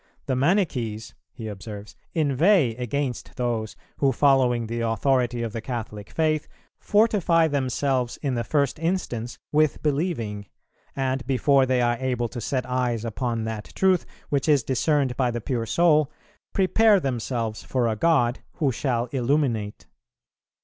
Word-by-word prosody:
"The 130 - 0
Manichees," 130 - 0 0.2
he 110 - -8
observes, 105 0 -8 0.2
"inveigh 155 - +3
against 125 +1 -3
those 115 -3 -2 0.2
who, 135 -1 +3
following 130 -3 +3
the 115 +1 -4
authority 120 +1 +1
of 115 -2 -4
the 115 - -4
Catholic 110 -3 -6
faith, 155 +3 0 0.3
fortify 200 -6 +3
themselves 130 -3 -1
in 140 -3 0
the 120 -1 -1
first 140 +3 0
instance 155 -9 -2
with 155 0 +2
believing, 135 - -1 0.5
and 135 0 -1
before 135 +1 +3
they 130 -1 +2
are 120 0 +2
able 125 -3 -1
to 120 - -6
set 130 +3 -1
eyes 125 -3 -1
upon 115 0 -2
that 110 -1 -5
truth, 190 -2 +2 0.2
which 140 +1 0
is 145 -4 +4
discerned 135 +1 +1
by 125 -2 +2
the 120 0 -3
pure 115 -1 -2
soul, 155 -2 +3 0.4
prepare 205 +2 +4
themselves 120 -5 -2
for 125 -3 0
a 110 - 0
God 125 -3 +2
who 145 -6 0
shall 120 -1 -1
illuminate. 125 -5 0
130 Hz, 140 wpm, -25 LUFS, 115-145 Hz, 0.5 s, is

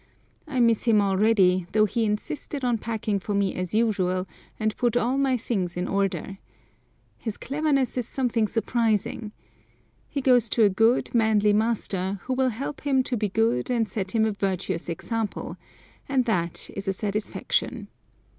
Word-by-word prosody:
I 275 -4 -2
miss 230 -2 +3
him 225 -3 +5
already, 190 -2 +3
though 215 0 +5
he 225 +2 0
insisted 255 +6 -3
on 240 -2 +1
packing 215 -3 -2
for 205 +2 -3
me 200 -1 +1
as 185 +2 -3
usual, 190 -5 +1 0.3
and 215 -1 0
put 240 -1 +1
all 245 +2 +1
my 270 -2 +2
things 190 -7 -2
in 180 +1 -1
order. 195 0 -1 0.8
His 220 -3 -4
cleverness 280 -2 0
is 240 - -3
something 235 -4 0
surprising. 225 -1 -1 0.8
He 285 - -2
goes 250 -4 +4
to 225 - +3
a 205 - +6
good, 225 +6 +2
manly 215 -3 +3
master, 205 -3 0
who 260 - -2
will 260 0 +2
help 270 +5 -5
him 270 -3 +2
to 250 - -2
be 210 -2 -1
good 220 - +1
and 235 -3 +1
set 190 -1 -4
him 220 -1 +4
a 220 - +1
virtuous 190 -3 -2
example, 220 +5 -3 0.5
and 260 -3 +2
that 175 -7 -1
is 200 0 -5
a 195 - +1
satisfaction. 210 - -2
220 Hz, 165 wpm, -25 LUFS, 195-245 Hz, 0.8 s, a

